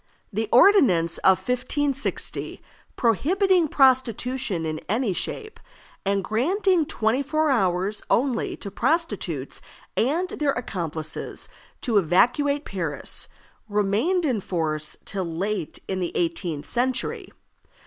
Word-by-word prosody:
The 220 +1 -1
ordinance 240 - +5
of 190 -1 +5
1560, 260 +6 -2 0.4
prohibiting 350 - +2
prostitution 255 - +2
in 155 0 -3
any 220 -1 +1
shape, 435 - -4 0.4
and 195 0 0
granting 335 - +1
twenty 225 +5 +1
four 310 +2 +1
hours 190 -3 +1
only 250 -2 +1
to 200 - -6
prostitutes 325 - -1 0.3
and 330 +10 +1
their 290 -3 0
accomplices 165 -9 -5 0.3
to 225 -5 +3
evacuate 265 - +2
Paris, 165 -7 -3 0.4
remained 210 - +1
in 250 -7 +1
force 155 -5 -2
till 195 -1 -2
late 175 +1 -3
in 190 -1 -2
the 175 -2 -3
eighteenth 165 -3 -2
century. 245 0 -1
230 Hz, 105 wpm, -24 LUFS, 185-280 Hz, 0.4 s, ordinance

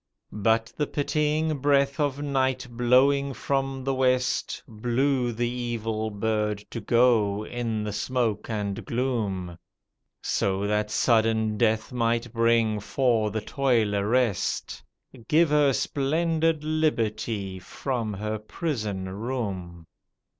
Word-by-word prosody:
But 115 +1 +2
the 150 - -1
pitying 150 +1 0
breath 140 +1 +2
of 145 -1 0
night 130 -2 0
blowing 130 +3 +3
from 135 -1 -2
the 135 +1 0
west 130 -1 0
Blew 120 +3 0
the 120 +1 -1
evil 115 -3 -2
bird 105 0 -1
to 115 - -4
go 110 -3 +3
in 115 -3 -3
the 105 -1 -3
smoke 120 -2 -1
and 105 -3 -3
gloom. 105 -9 -2 0.6
So 100 0 0
that 105 0 0
sudden 110 -1 +2
death 110 +1 +1
might 115 -1 0
bring 115 -2 +2
for 115 -1 +1
the 110 +1 -3
toiler 110 -5 +1
rest 120 -5 0 0.3
— - - -19
Give 160 0 +4
her 145 -2 +4
splendid 160 +4 0
liberty 115 -10 -1
from 115 +4 -3
her 110 +2 -3
prison 110 - -3
room. 95 -5 -4
115 Hz, 120 wpm, -26 LUFS, 105-135 Hz, 0.6 s, Give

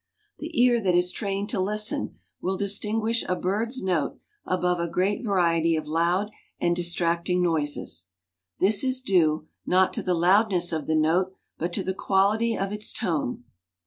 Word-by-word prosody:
The 320 -1 -4
ear 240 -1 +4
that 185 -3 +2
is 180 0 +3
trained 200 -1 -3
to 210 - -1
listen 210 +3 -1 0.3
will 190 +1 -1
distinguish 215 +3 0
a 185 - +2
bird's 225 +8 -1
note 180 -6 -1 0.3
above 180 -1 0
a 170 - -1
great 195 +7 0
variety 170 -5 +2
of 155 -1 -3
loud 170 +6 0 0.3
and 175 0 +1
distracting 175 +1 0
noises. 155 - -1 0.5
This 200 +5 +3
is 260 -1 +1
due, 160 -9 +2 0.2
not 185 +1 +3
to - - -2
the 180 -1 0
loudness 180 +1 +3
of 155 -3 -3
the 160 - +1
note, 170 +5 +2 0.3
but 170 +2 -2
to - - -1
the 190 - -2
quality 205 +5 +1
of 195 0 -2
its 210 0 -2
tone. 150 -8 -2
185 Hz, 165 wpm, -25 LUFS, 170-210 Hz, 0.5 s, ear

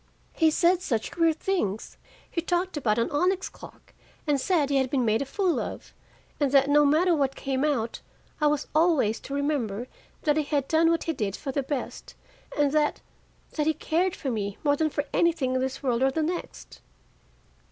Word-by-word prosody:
He 320 -2 +4
said 345 +3 +3
such 230 -10 -2
queer 330 -1 +3
things: 310 - -2 0.3
he 335 - -2
talked 355 +2 -1
about 235 -7 +1
an 230 - 0
onyx 365 +5 +1
clock, - - -15 0.3
and 290 -3 +1
said 300 -4 +1
he 280 - +3
had 265 -1 +1
been 260 -2 +1
made 220 +2 +2
a - - -1
fool 365 +3 0
of, - - -6 0.5
and 285 -3 +1
that 275 0 +5
no 295 0 +6
matter 335 +5 +3
what 275 -3 0
came 270 0 -2
out, 250 -7 -1 0.4
I 300 - +4
was 295 -1 +1
always 310 -9 +3
to 275 - -6
remember 255 -6 -1 0.4
that 300 -2 +2
he 310 - +2
had 285 -2 -1
done 325 +1 +3
what 335 -1 +1
he 325 - -1
did 205 -7 -2
for 275 - -5
the 280 - 0
best, 270 0 -5 0.4
and 290 -1 +3
that 300 0 +1 0.5
that 300 -1 -1
he 315 - +2
cared 350 +3 0
for 270 - -3
me 200 -3 -3
more 290 -1 +3
than 310 +1 +1
for 290 - -2
anything 320 -7 +2
in 255 - +1
this 265 +1 -3
world 245 -2 +1
or 265 - +4
the 315 +4 -1
next." 345 +3 -5
290 Hz, 200 wpm, -26 LUFS, 260-325 Hz, 0.5 s, no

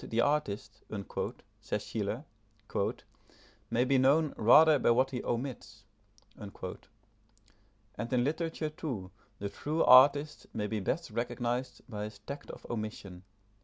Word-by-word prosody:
"The 115 - -2
artist," 145 -7 -1 0.8
says - - -3
Schiller, - - -3 1.4
"may 120 +2 +2
be 135 0 +3
known 145 +3 +4
rather 150 +7 +7
by - - +3
what 125 +3 +3
he 125 - -4
omits"; 115 -4 -4 0.5
and 100 -2 -10 1.6
in 125 -1 +3
literature, 160 +2 -2
too, 120 -12 -5 0.3
the 100 0 -4
true 155 +9 -1
artist 145 +4 +6
may 105 - -1
be 110 +1 -2
best 155 - -2
recognised 120 +1 -2
by 105 -4 -4
his 105 -1 -9
tact 140 +8 -8
of - - -10
omission. 105 -5 -5
125 Hz, 125 wpm, -31 LUFS, 110-145 Hz, 1.6 s, rather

